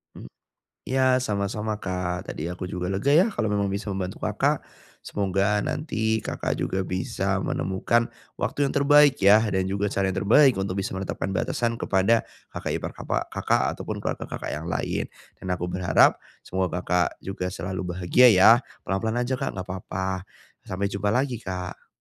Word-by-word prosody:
Hmm. - - -11 0.5
Iya, 130 -1 +2
sama-sama 105 -1 -2
Kak. 90 -1 -3
Tadi 80 +3 -4
aku 90 +1 -5
juga 90 0 -3
lega 105 +9 +1
ya 175 +6 +6
kalau 110 - -1
memang 100 -1 0
bisa 100 +2 -4
membantu 95 0 -4
Kakak. - - +1 0.4
Semoga 100 +1 0
nanti 110 -5 -1
Kakak - - -2
juga 95 - -1
bisa 90 0 -1
menemukan 95 +7 0 0.3
waktu 145 - 0
yang - - -4
terbaik 145 0 +5
ya, 100 +2 +7
dan 95 0 0
juga 100 +1 -1
cara 100 -1 +1
yang 95 - -3
terbaik 130 +4 +6
untuk 95 -1 -2
bisa 95 - -4
menetapkan 95 -2 -3
batasan 115 +4 -1
kepada 105 +2 +2 0.3
kakak - - -3
ipar - - -5
kapak - - -2
Kakak - - 0
ataupun - - -5
keluarga - - -3
Kakak - - -6
yang 75 +2 -4
lain. 85 -3 -2 0.3
Dan 95 - -4
aku 90 0 -2
berharap 90 -1 +4 0.2
semoga 95 -1 -2
Kakak 90 0 0
juga 95 -1 -4
selalu 90 +1 -4
bahagia 95 +8 +6
ya. 95 +2 +7 0.3
Pelan-pelan 110 +5 -1
aja 130 - 0
Kak, - - -3
enggak 95 -1 -6
papa. 95 0 -4 0.4
Sampai 100 +2 -2
jumpa 100 +1 -1
lagi, 130 0 0
Kak. 90 -1 -6
95 Hz, 165 wpm, -25 LUFS, 95-110 Hz, 0.5 s, ya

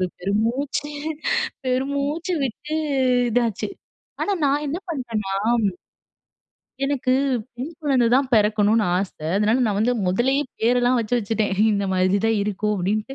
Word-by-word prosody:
ஒரு 185 - +1
பெரு 195 +3 -2
மூச்சு, 280 +4 -2 0.7
பெரு 255 +1 +1
மூச்சு 305 +6 -1
விட்டு 300 +5 -4 0.5
இதாச்சு. 230 - 0 0.5
ஆனா 410 - 0
நான் 285 +2 +1
என்ன 305 +5 -2
பண்ணேன்னா 230 - -3 1.5
எனக்கு 270 -2 0 0.4
பெண் 270 +7 -5
குழந்தை 265 -5 +3
தான் 265 0 +2
பிறக்கணும்னு 215 +1 +3
ஆச. 190 0 -1 0.3
அதனால 215 +4 +3
நான் 205 -2 0
வந்து 240 +3 +2
முதல்லயே 265 +10 +2 0.2
பேரெல்லாம் 245 +2 +3
வச்சு 230 +2 -2
வச்சுட்டேன். 215 -1 -1 0.2
இந்த 200 -1 0
மாரிதான் 195 +4 +2
இருக்கும். 210 +1 -1
அப்பிடீன்ட்டு. 210 +7 -2
235 Hz, 130 wpm, -22 LUFS, 210-275 Hz, 1.5 s, குழந்தை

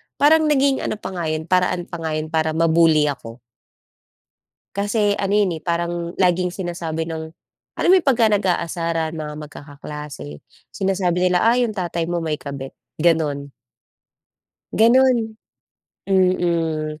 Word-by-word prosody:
parang 310 +2 +4
naging 275 -2 +3
ano - - -2
pa 210 - -7
nga 175 -3 -3
'yon 155 0 -2
paraan 180 -1 +1
pa 170 - -7
nga 160 -1 -3
'yon 155 0 -4
para 160 -1 0
ma-bully 165 -2 +4
ako. 120 -3 -10 1.4
Kasi, 205 0 +1
ano 195 -1 -2
yun, 205 -4 +2
eh, 160 - -10
parang 170 0 -2
laging 180 -1 +2
sinasabi 170 -3 -4
ng 160 -1 -6 0.4
alam - - 0
mo - - +8
yun, 325 - -11
'pagka 240 -4 +4
nag-aasaran 170 -4 -1
mga 150 -1 -5
magkakaklase 145 - -9 0.3
sinasabi 185 -2 0
nila, 180 -1 +2
"Ah, 230 +2 +4
yung 240 -3 +1
tatay 170 -3 -2
mo 175 0 -1
may 155 -2 -1
kabit." 140 -2 -7 0.3
ganun. 150 -4 +1 1.2
Gano'n, 255 +3 +5 0.9
mm. 170 -5 +1
170 Hz, 140 wpm, -21 LUFS, 155-195 Hz, 1.4 s, mo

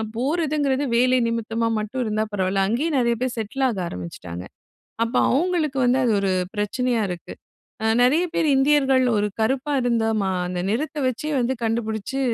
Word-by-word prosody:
போறதுங்கிறது 285 0 0
வேலை 255 +1 +4
நிமித்தமா 230 0 -1
மட்டும் 220 +5 -3
இருந்தா 215 0 0
பரவாயில்லை, 195 0 +1
அங்கயே 270 +9 0
நெறைய 235 -2 +2
பேர் 255 -1 -1
செட்டில் 245 +5 -1
ஆக 210 -6 -3
ஆரம்பிச்சிட்டாங்க. 90 - -7 0.6
அப்போ, 230 - -1
அவங்களுக்கு 310 -2 0
வந்து 250 +2 +3
அது 230 - +2
ஒரு 195 -1 +1 0.2
பிரச்சனையா 230 +3 0
இருக்கு. 175 -1 -7 0.5
அ - - +2 0.2
நெறைய 300 +8 +4
பேர், 315 - +2
இந்தியர்கள் 270 -2 +3
ஒரு 210 0 +1
கருப்பா 270 +5 0
இருந்தா 230 -2 +1
மா 190 - 0 0.2
அந்த 180 0 -3
நிறத்தை 295 +6 -2
வைச்சே 255 +5 -2
வந்து 250 +2 0
கண்டுபிடிச்சு, 225 +2 -2
245 Hz, 155 wpm, -23 LUFS, 215-270 Hz, 0.6 s, வேலை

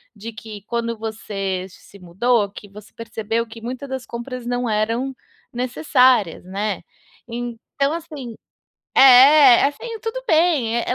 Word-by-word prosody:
de 225 +3 -8
que 215 -1 -10
quando 230 -1 -2
você 195 -4 -4
se 200 +2 -17
mudou, 200 +4 0
que 205 0 -12
você 210 +1 -14
percebeu 230 0 -3
que 225 0 -12
muita 255 +4 -6
das 260 -2 -5
compras 240 +1 -7
não 245 -1 -2
eram 230 +5 -1 0.4
necessárias, 250 - +2
né. 195 -1 -3 0.4
Então, 240 +4 -3
assim 300 -9 -7 0.6
é, 270 0 +8
assim, 445 - -3
tudo 460 +2 -5
bem, 315 - +2
é - - -2
é - - +1
235 Hz, 135 wpm, -21 LUFS, 215-260 Hz, 0.6 s, é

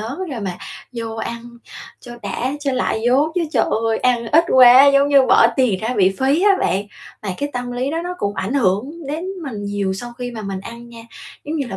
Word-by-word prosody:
lớn 230 +8 -6
rồi 250 -5 -5
mà 195 -3 -3 0.4
vô 230 -2 -5
ăn 235 +1 -5 0.6
cho 240 - -11
đã, 220 +6 -3
cho 280 -2 -1
lại 250 -3 -1
vốn 275 +5 +3
chứ 360 - 0
trời - - +2 0.2
ơi, 225 - 0
ăn 240 -2 +1
ít 325 +3 +5
quá, 255 +1 +8
giống 280 0 +4
như 280 -1 +5
bỏ 230 - +6
tiền 240 -8 +1
ra 220 - -3
bị 190 -1 +3
phí 275 +6 +2
á 410 - +5
bạn." 195 - 0 0.4
Mà 210 - -5
cái 285 - -2
tâm 245 0 -4
lý 255 +3 -2
đó 325 - -2
nó 360 0 -4
cũng 200 0 -2
ảnh 210 +7 -3
hưởng 215 0 +1 0.2
đến 310 +4 -4 0.2
mình 220 -9 -6
nhiều 200 -1 -2
sau 240 +5 -7
khi 245 0 -4
mà 225 -2 -7
mình 195 -2 -5
ăn 235 +4 -10
nha, 230 -1 -12 0.4
giống 310 +2 -4
như 280 -4 -2
là 190 - -5
245 Hz, 235 wpm, -19 LUFS, 215-275 Hz, 0.6 s, quá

